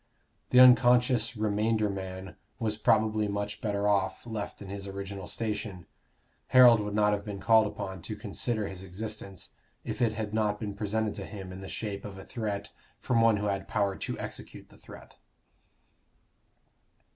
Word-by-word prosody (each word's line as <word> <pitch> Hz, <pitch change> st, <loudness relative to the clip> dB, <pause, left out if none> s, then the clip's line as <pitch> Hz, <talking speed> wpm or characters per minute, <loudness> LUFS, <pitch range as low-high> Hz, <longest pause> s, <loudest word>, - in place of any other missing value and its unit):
The 125 Hz, -, +6 dB
unconscious 125 Hz, -1 st, +6 dB
remainder 110 Hz, +1 st, +1 dB
man 95 Hz, -2 st, -6 dB, 0.2 s
was 110 Hz, -2 st, -1 dB
probably 110 Hz, 0 st, +2 dB
much 100 Hz, 0 st, -3 dB
better 105 Hz, -1 st, 0 dB
off, 100 Hz, -1 st, 0 dB
left 110 Hz, -3 st, -5 dB
in 100 Hz, -, -9 dB
his 100 Hz, 0 st, -6 dB
original 100 Hz, -1 st, -6 dB
station: 105 Hz, -5 st, -3 dB, 0.6 s
Harold 125 Hz, -3 st, +8 dB
would 105 Hz, 0 st, -3 dB
not 105 Hz, 0 st, +3 dB
have 100 Hz, -1 st, -2 dB
been 100 Hz, -2 st, -6 dB
called 110 Hz, +2 st, +5 dB
upon 95 Hz, -3 st, -6 dB
to 105 Hz, -, -5 dB
consider 105 Hz, +1 st, -1 dB
his 95 Hz, -1 st, -7 dB
existence, 100 Hz, 0 st, -6 dB, 0.3 s
if -, -, -5 dB
it 115 Hz, -2 st, +3 dB
had 110 Hz, -1 st, -4 dB
not 105 Hz, -1 st, 0 dB
been 105 Hz, -3 st, -4 dB
presented 105 Hz, +1 st, -1 dB
to -, -, -5 dB
him 95 Hz, -3 st, -8 dB
in 95 Hz, +1 st, -8 dB
the 95 Hz, -, -8 dB
shape 100 Hz, -3 st, -4 dB
of 100 Hz, -2 st, -8 dB
a 95 Hz, -, -10 dB
threat 105 Hz, -5 st, -4 dB, 0.3 s
from 115 Hz, -2 st, +1 dB
one 115 Hz, -2 st, +5 dB
who 105 Hz, -, -2 dB
had 100 Hz, -1 st, -2 dB
power 100 Hz, -1 st, 0 dB
to -, -, -4 dB
execute -, -, -7 dB
the -, -, -18 dB
threat. -, -, -14 dB
105 Hz, 170 wpm, -29 LUFS, 100-110 Hz, 0.6 s, Harold